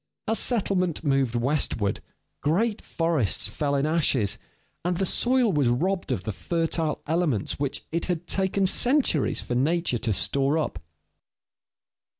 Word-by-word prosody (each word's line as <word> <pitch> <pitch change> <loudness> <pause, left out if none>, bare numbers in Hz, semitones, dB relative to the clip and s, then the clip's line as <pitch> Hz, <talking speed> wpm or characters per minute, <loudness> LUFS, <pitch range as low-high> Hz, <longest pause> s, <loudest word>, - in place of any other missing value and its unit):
As 225 +1 +2
settlement 185 - +1
moved 135 -5 +1
westward, 120 -5 0 0.4
great 205 +8 0
forests 155 - 0
fell 140 -1 -2
in 140 +1 +1
ashes, 145 - +1 0.4
and 175 0 -1
the 195 - 0
soil 245 +2 +2
was 145 -4 +2
robbed 180 +10 -1
of 90 - -2
the 110 - -3
fertile 165 - -2
elements 155 - -1
which 140 -2 -2
it 170 +1 -1
had 175 -2 -3
taken 190 +1 +1
centuries 245 - +2
for - - -4
nature 145 0 +1
to 110 - -1
store 140 +8 +1
up. 145 - -2
160 Hz, 140 wpm, -25 LUFS, 135-180 Hz, 0.4 s, As